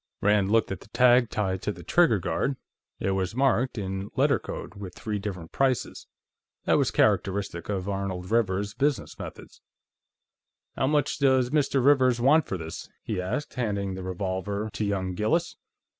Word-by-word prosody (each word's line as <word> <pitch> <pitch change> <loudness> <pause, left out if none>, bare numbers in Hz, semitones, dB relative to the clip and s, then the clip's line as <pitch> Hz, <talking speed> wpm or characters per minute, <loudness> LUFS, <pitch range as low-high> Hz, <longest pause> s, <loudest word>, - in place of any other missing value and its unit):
Rand 100 -1 +3
looked 115 -2 +3
at 95 - -3
the - - -16
tag 120 +1 +4
tied 95 -4 -1
to - - -1
the - - -10
trigger 170 -11 +4
guard; 90 +10 -1 0.4
it 95 - 0
was 95 +2 -1
marked, 130 -1 +2
in 95 0 -4
letter 135 -3 +3
code, - - -7
with 100 -3 -9
three 105 -2 -3
different 95 -5 -6
prices. 135 -2 -1 0.6
That - - +4
was - - +2
characteristic 95 -3 0
of 95 -2 -2
Arnold 95 -2 -3
Rivers's 100 -3 +1
business 140 -1 -1
methods. - - -9 1.1
"How 130 - +1
much 150 0 +1
does 130 -3 +3
Mr. 140 -3 +2
Rivers 130 -4 +4
want 140 +5 +4
for 95 - -2
this?" 80 -1 -7
he 105 -5 -2
asked, 120 +11 -3
handing 100 -6 -2
the 95 - -6
revolver 95 +3 -3
to - - -2
young 95 -2 -1
Gillis. 160 - 0
105 Hz, 165 wpm, -27 LUFS, 95-130 Hz, 1.1 s, tag